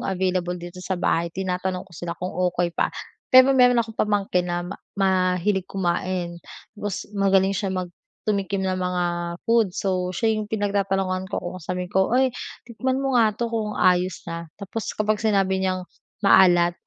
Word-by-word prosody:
available 185 Hz, -2 st, -1 dB
dito 175 Hz, +1 st, -9 dB
sa 185 Hz, 0 st, -2 dB
bahay 170 Hz, -1 st, +1 dB
tinatanong 185 Hz, +1 st, -3 dB
ko 195 Hz, -, -22 dB
sila 170 Hz, +1 st, -5 dB
kung 180 Hz, +1 st, -4 dB
okey 175 Hz, -1 st, 0 dB
pa. -, -, +1 dB, 0.4 s
Pero 255 Hz, +1 st, +7 dB
meron 250 Hz, -2 st, +5 dB
akong 225 Hz, -, -10 dB
pamangkin 195 Hz, -4 st, +1 dB
na 175 Hz, 0 st, -2 dB
ma 185 Hz, +3 st, -6 dB, 0.2 s
mahilig 190 Hz, 0 st, +1 dB
kumain 175 Hz, -1 st, -2 dB, 0.3 s
tapos 205 Hz, -2 st, -4 dB
magaling 195 Hz, -1 st, +3 dB
siya 200 Hz, 0 st, -2 dB
mag 185 Hz, -2 st, -3 dB, 0.3 s
tumikim 200 Hz, -2 st, -1 dB
ng 185 Hz, -1 st, 0 dB
mga 180 Hz, -1 st, -1 dB, 0.4 s
food 225 Hz, -5 st, +3 dB
so 185 Hz, -2 st, 0 dB
siya 220 Hz, +4 st, +1 dB
yung 210 Hz, -, -6 dB
pinagtatanungan 195 Hz, -3 st, 0 dB
ko, -, -, -3 dB
kung 180 Hz, +1 st, -5 dB
sabihin 180 Hz, +2 st, -4 dB
ko, 190 Hz, 0 st, +3 dB
"Oy 255 Hz, +1 st, +2 dB, 0.3 s
tikman 255 Hz, +2 st, -2 dB
mo 270 Hz, 0 st, -1 dB
nga 220 Hz, -3 st, +3 dB
'to 235 Hz, 0 st, -2 dB
kung 215 Hz, -2 st, -2 dB
ayos 180 Hz, 0 st, +2 dB
na". 170 Hz, -1 st, -6 dB
Tapos 205 Hz, +2 st, -5 dB
kapag 215 Hz, 0 st, 0 dB
sinabi 195 Hz, -3 st, +2 dB
niyang 185 Hz, -1 st, -1 dB, 0.4 s
maalat 175 Hz, -3 st, +6 dB
190 Hz, 165 wpm, -24 LUFS, 180-205 Hz, 0.4 s, Pero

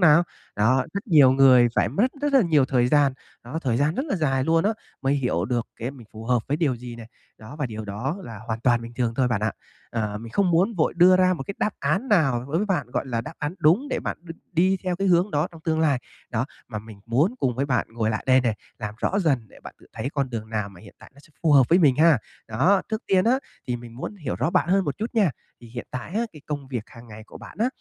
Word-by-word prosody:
nào? 165 Hz, -1 st, +6 dB, 0.3 s
Đó, 125 Hz, +5 st, +3 dB
rất 200 Hz, +4 st, -4 dB
nhiều 145 Hz, -8 st, +6 dB
người 130 Hz, -2 st, +6 dB
phải -, -, +2 dB
mất 200 Hz, -, +2 dB
rất 290 Hz, 0 st, 0 dB
là 270 Hz, -, +6 dB
nhiều 155 Hz, -6 st, +3 dB
thời 125 Hz, -2 st, +2 dB
gian, 145 Hz, -1 st, +4 dB, 0.3 s
đó, 125 Hz, +7 st, -4 dB
thời 125 Hz, -4 st, 0 dB
gian 145 Hz, +5 st, +1 dB
rất 265 Hz, -, -1 dB
là 270 Hz, -, -1 dB
dài 135 Hz, -5 st, +1 dB
luôn 165 Hz, +3 st, +2 dB
á, 210 Hz, -, +3 dB, 0.3 s
mới 135 Hz, +1 st, +2 dB
hiểu 125 Hz, -11 st, 0 dB
được 120 Hz, +2 st, -1 dB
cái 120 Hz, +3 st, -4 dB
mình 125 Hz, -5 st, -13 dB
phù 110 Hz, +1 st, -9 dB
hợp 120 Hz, -1 st, +1 dB
với 145 Hz, -, +1 dB
điều 145 Hz, -7 st, +1 dB
gì 120 Hz, 0 st, -9 dB
này. 115 Hz, -1 st, -10 dB, 0.3 s
Đó, 110 Hz, +7 st, -11 dB
và 145 Hz, -, -1 dB
điều 110 Hz, -2 st, -6 dB
đó 110 Hz, -, -3 dB
là 115 Hz, -7 st, -8 dB
hoàn 110 Hz, -1 st, -3 dB
toàn 120 Hz, -1 st, +2 dB
bình 115 Hz, +1 st, -9 dB
thường 120 Hz, -2 st, -1 dB
thôi, 130 Hz, -2 st, +2 dB
bạn 110 Hz, -4 st, 0 dB
ạ. 105 Hz, -1 st, 0 dB, 0.4 s
Ờ, 105 Hz, -3 st, -2 dB
mình 115 Hz, +1 st, -10 dB
không 195 Hz, -3 st, +2 dB
muốn 185 Hz, +7 st, +2 dB
vội 165 Hz, -5 st, +1 dB
đưa 180 Hz, +1 st, +7 dB
ra 185 Hz, 0 st, +3 dB
một 145 Hz, -, -5 dB
cái 200 Hz, -, -5 dB
đáp 215 Hz, -, +1 dB
án 155 Hz, -, 0 dB
nào 135 Hz, -, +2 dB
đối 155 Hz, -, -1 dB
với 205 Hz, +5 st, 0 dB
bạn, 175 Hz, -, 0 dB
gọi -, -, -2 dB
là, 120 Hz, -3 st, -1 dB
đáp 150 Hz, +7 st, -8 dB
án 150 Hz, +4 st, -3 dB
đúng 180 Hz, -, +3 dB
để -, -, -2 dB
bạn -, -, -3 dB
đ 170 Hz, -, -11 dB, 0.2 s
đi 185 Hz, +3 st, +3 dB
theo 180 Hz, -1 st, -1 dB
cái 195 Hz, +1 st, 0 dB
hướng 180 Hz, +3 st, +3 dB
đó 150 Hz, +1 st, 0 dB
trong 165 Hz, -, -13 dB
tương 160 Hz, -1 st, +1 dB
lai. 145 Hz, -5 st, +3 dB, 0.3 s
Đó, 120 Hz, +1 st, 0 dB, 0.2 s
mà 110 Hz, -3 st, -4 dB
mình 105 Hz, -1 st, -12 dB
muốn 140 Hz, -, +2 dB
cùng 125 Hz, -2 st, 0 dB
với 135 Hz, +3 st, -1 dB
bạn 125 Hz, -4 st, 0 dB
ngồi 115 Hz, -1 st, -1 dB
lại 110 Hz, -, -3 dB
đây 130 Hz, 0 st, +5 dB
nè, 120 Hz, -4 st, 0 dB, 0.2 s
làm 105 Hz, -1 st, -5 dB
rõ 195 Hz, -, 0 dB
dần 135 Hz, -, 0 dB
để -, -, -18 dB
bạn -, -, -11 dB
tự -, -, -19 dB
thấy -, -, -4 dB
con 140 Hz, -3 st, -1 dB
đường 110 Hz, -2 st, -5 dB
nào 105 Hz, -2 st, -2 dB
mà 95 Hz, -3 st, -15 dB
hiện 100 Hz, -, -15 dB
tại -, -, -15 dB
nó 140 Hz, -, -17 dB
sẽ -, -, -21 dB
phù 160 Hz, -3 st, +3 dB
hợp 135 Hz, -4 st, +6 dB
với 175 Hz, -, +5 dB
mình 145 Hz, -8 st, +4 dB
ha. 160 Hz, -3 st, +5 dB, 0.3 s
Đó, 180 Hz, -, +3 dB
trước 220 Hz, +1 st, -2 dB
tiên 185 Hz, -1 st, +3 dB
á, 250 Hz, +4 st, +3 dB, 0.3 s
thì 125 Hz, -1 st, -1 dB
mình 120 Hz, -1 st, -11 dB
muốn 170 Hz, +10 st, -6 dB
hiểu 150 Hz, -9 st, -4 dB
rõ 160 Hz, -, 0 dB
bạn -, -, +1 dB
hơn 195 Hz, +1 st, +3 dB
một 145 Hz, -, -3 dB
chút 225 Hz, +3 st, -4 dB
nha. 205 Hz, -7 st, +3 dB, 0.3 s
Thì 120 Hz, -, -13 dB
hiện 120 Hz, +1 st, -7 dB
tại 130 Hz, +6 st, -6 dB
á, 225 Hz, -, +1 dB
cái 150 Hz, -, -13 dB
công 145 Hz, -3 st, -5 dB
việc 125 Hz, -5 st, -3 dB
hàng 115 Hz, -1 st, -14 dB
ngày 110 Hz, 0 st, -10 dB
của -, -, -12 dB
bạn -, -, -12 dB
á, 230 Hz, -, +4 dB
135 Hz, 285 wpm, -24 LUFS, 120-170 Hz, 0.4 s, đưa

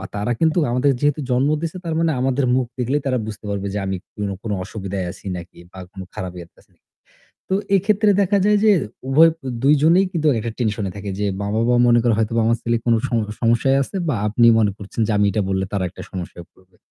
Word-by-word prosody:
তারা 105 Hz, +4 st, -1 dB
কিন্তু 160 Hz, +1 st, +2 dB
আমাদের 125 Hz, +3 st, +2 dB
যেহেতু 145 Hz, 0 st, +1 dB
জন্ম 130 Hz, +4 st, +2 dB
দিছে 165 Hz, +2 st, -4 dB
তার 165 Hz, -, -2 dB
মানে 165 Hz, -1 st, +2 dB
আমাদের 135 Hz, +1 st, +1 dB
মুখ 130 Hz, -1 st, +1 dB
দেখলেই 135 Hz, +4 st, 0 dB
তারা 130 Hz, -1 st, +1 dB
বুঝতে 105 Hz, 0 st, -8 dB
পারবে 100 Hz, 0 st, -3 dB
যে 105 Hz, -, -1 dB
আমি 95 Hz, 0 st, -2 dB, 0.2 s
কোন, 105 Hz, -2 st, -3 dB
কোন 110 Hz, -, -4 dB
অসুবিধায় 95 Hz, -2 st, -5 dB
আছি -, -, -16 dB
নাকি 85 Hz, 0 st, -11 dB
বা 95 Hz, -, -11 dB
কোন 95 Hz, -2 st, -9 dB
খারাপ 90 Hz, -1 st, -5 dB
ইয়াতে 85 Hz, -, -13 dB
আছি -, -, -36 dB
নাকি। -, -, -46 dB, 0.7 s
তো 190 Hz, -, +2 dB, 0.2 s
এক্ষেত্রে 210 Hz, +2 st, +2 dB
দেখা 200 Hz, +1 st, +2 dB
যায় 210 Hz, 0 st, +4 dB
যে 215 Hz, -, +6 dB, 0.4 s
উভয় 160 Hz, +5 st, +6 dB, 0.3 s
দুইজনেই 155 Hz, +6 st, +4 dB
কিন্তু 155 Hz, -3 st, -1 dB
একটা 115 Hz, +2 st, -3 dB
টেনশন 110 Hz, -3 st, -1 dB
এ -, -, -5 dB
থাকে। 100 Hz, 0 st, -5 dB
যে 105 Hz, -, 0 dB
মা-বাবা 110 Hz, +4 st, +1 dB
মনে 120 Hz, 0 st, +5 dB
করে 115 Hz, -2 st, +3 dB
হয়তো 110 Hz, 0 st, 0 dB
বাবার 115 Hz, +1 st, +2 dB
ছেলে 120 Hz, 0 st, +1 dB
কোন 120 Hz, -, +4 dB
সম 120 Hz, -, 0 dB, 0.2 s
সমস্যায় 120 Hz, +3 st, +2 dB
আছে 195 Hz, -, -6 dB
বা 140 Hz, -, +1 dB
আপনি 115 Hz, +3 st, +3 dB
মনে 105 Hz, -2 st, +3 dB
করছেন 100 Hz, +3 st, -7 dB
যে 110 Hz, -, 0 dB
আমি 105 Hz, -, +3 dB
এটা 105 Hz, 0 st, 0 dB
বললে 95 Hz, 0 st, 0 dB
তারা 100 Hz, -2 st, -1 dB
একটা -, -, -10 dB
সমস্যায় 90 Hz, -2 st, -7 dB
পড়বে। 95 Hz, -1 st, -27 dB
115 Hz, 220 wpm, -20 LUFS, 100-145 Hz, 0.7 s, যে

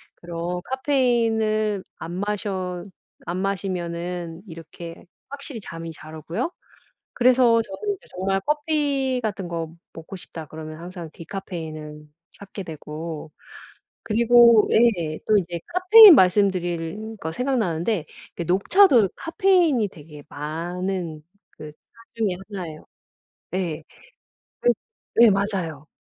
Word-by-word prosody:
그런 175 Hz, +1 st, -5 dB
카페인을 225 Hz, -6 st, +1 dB
안 165 Hz, +1 st, -7 dB
마셔 190 Hz, -2 st, -3 dB, 0.4 s
안 175 Hz, +1 st, -3 dB
마시면은 175 Hz, -3 st, -3 dB
이렇게 165 Hz, 0 st, -10 dB, 0.3 s
확실히 280 Hz, -3 st, -6 dB
잠이 165 Hz, -3 st, -7 dB
잘 155 Hz, 0 st, -11 dB
오고요. 165 Hz, -, -3 dB, 0.6 s
그래서 245 Hz, -2 st, +4 dB
저는 395 Hz, -, -4 dB
이제 -, -, -22 dB
정말 195 Hz, +1 st, -1 dB
'커피 290 Hz, -4 st, 0 dB
같은 200 Hz, -4 st, -3 dB
거 165 Hz, -1 st, -4 dB, 0.2 s
먹고 165 Hz, +4 st, -9 dB
싶다.' 165 Hz, -3 st, -8 dB
그러면 155 Hz, +1 st, -9 dB
항상 175 Hz, -2 st, -8 dB
디카페인을 160 Hz, -4 st, -7 dB, 0.3 s
찾게 200 Hz, -1 st, -9 dB
되고 155 Hz, 0 st, -7 dB, 0.7 s
그리고 235 Hz, 0 st, +6 dB
예 175 Hz, -10 st, +2 dB
또 215 Hz, -, +5 dB
이제 175 Hz, -2 st, -2 dB
카페인 370 Hz, +1 st, +9 dB
말씀드리니까 185 Hz, 0 st, +1 dB
생각나는데 215 Hz, -, 0 dB, 0.3 s
그 170 Hz, -, -3 dB
녹차도 220 Hz, -, +5 dB
카페인이 330 Hz, -, +2 dB
되게 150 Hz, -3 st, -13 dB
많은 170 Hz, +2 st, -4 dB, 0.3 s
그 150 Hz, -1 st, -10 dB
차 -, -, -42 dB, 0.4 s
중에 220 Hz, -3 st, +1 dB, 0.2 s
1 185 Hz, -5 st, -5 dB
예요. 155 Hz, -1 st, -12 dB, 0.7 s
네. 170 Hz, -4 st, -3 dB, 0.8 s
그 -, -, +2 dB, 0.5 s
네 235 Hz, -1 st, +8 dB
맞아요. 185 Hz, -7 st, -2 dB
185 Hz, 240 characters per minute, -23 LUFS, 165-230 Hz, 0.8 s, 카페인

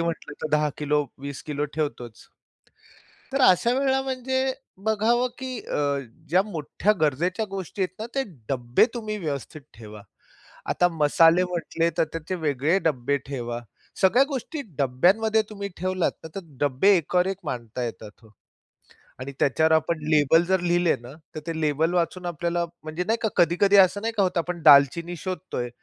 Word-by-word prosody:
म्हटलं 165 Hz, -3 st, -3 dB
तर 155 Hz, -, -2 dB
10 150 Hz, 0 st, +2 dB
kilo, 150 Hz, 0 st, 0 dB, 0.2 s
20 140 Hz, -1 st, -6 dB
kilo 150 Hz, -1 st, -2 dB
ठेवतोच. 120 Hz, -7 st, -4 dB, 1.1 s
तर 275 Hz, -, 0 dB
अशा 210 Hz, +5 st, +5 dB
वेळा 265 Hz, -1 st, +2 dB
म्हणजे 260 Hz, 0 st, -1 dB, 0.3 s
बघावं, 225 Hz, +3 st, +2 dB
की 260 Hz, -2 st, -5 dB
अ, 140 Hz, -1 st, -1 dB, 0.3 s
ज्या 180 Hz, +4 st, +4 dB
मोठ्या 200 Hz, +2 st, -1 dB
गरजेच्या 170 Hz, +8 st, +1 dB
गोष्टी 195 Hz, 0 st, -4 dB
आहेत 185 Hz, 0 st, -2 dB
ना, 220 Hz, -, -3 dB
ते 270 Hz, -, +1 dB, 0.3 s
डब्बे 125 Hz, -, +2 dB
तुम्ही 215 Hz, -3 st, -4 dB
व्यवस्थित 150 Hz, -2 st, -5 dB
ठेवा. 105 Hz, -2 st, -11 dB, 0.7 s
आता 175 Hz, -, +3 dB
मसाले 165 Hz, +2 st, +4 dB
म्हटले 170 Hz, -1 st, -1 dB
तर -, -, +4 dB
त्याचे 165 Hz, +3 st, -4 dB
वेगळे 155 Hz, +2 st, +1 dB
डब्बे 140 Hz, -3 st, 0 dB
ठेवा. 120 Hz, -3 st, -4 dB, 0.4 s
सगळ्या 205 Hz, +7 st, +5 dB
गोष्टी 280 Hz, +2 st, -4 dB, 0.2 s
डब्यांमध्ये 190 Hz, -, +3 dB
तुम्ही 200 Hz, -1 st, -5 dB
ठेवलात, 185 Hz, 0 st, 0 dB
तर -, -, -6 dB
ते -, -, -2 dB, 0.2 s
डब्बे 145 Hz, +8 st, +4 dB
एकावर-एक 180 Hz, +3 st, 0 dB
मांडता 120 Hz, 0 st, -5 dB
येतात 110 Hz, -2 st, -7 dB
हो 110 Hz, -, -18 dB, 0.9 s
आणि 130 Hz, +2 st, -6 dB
त्याच्यावर 160 Hz, +3 st, +2 dB
आपण 160 Hz, +1 st, +2 dB
लेबल 155 Hz, +2 st, +4 dB
जर 190 Hz, 0 st, +2 dB
लिहिले 175 Hz, -1 st, +2 dB
ना, 120 Hz, +2 st, -11 dB, 0.2 s
तर -, -, -3 dB
ते 165 Hz, -1 st, -3 dB
लेबल 155 Hz, +3 st, +1 dB
वाचून 180 Hz, +1 st, -1 dB
आपल्याला 170 Hz, +1 st, -1 dB, 0.2 s
म्हणजे 155 Hz, +3 st, -3 dB
नाही 225 Hz, +1 st, +2 dB
का, 220 Hz, -, +1 dB
कधी-कधी 180 Hz, +4 st, +4 dB
असं 190 Hz, +1 st, +5 dB
नाही 230 Hz, +1 st, -2 dB
का 200 Hz, -, +4 dB
होतं, 180 Hz, -2 st, 0 dB
आपण 175 Hz, 0 st, -4 dB
दालचिनी 155 Hz, +4 st, +6 dB
शोधतोय 180 Hz, -8 st, -4 dB
170 Hz, 160 wpm, -25 LUFS, 145-195 Hz, 1.1 s, दालचिनी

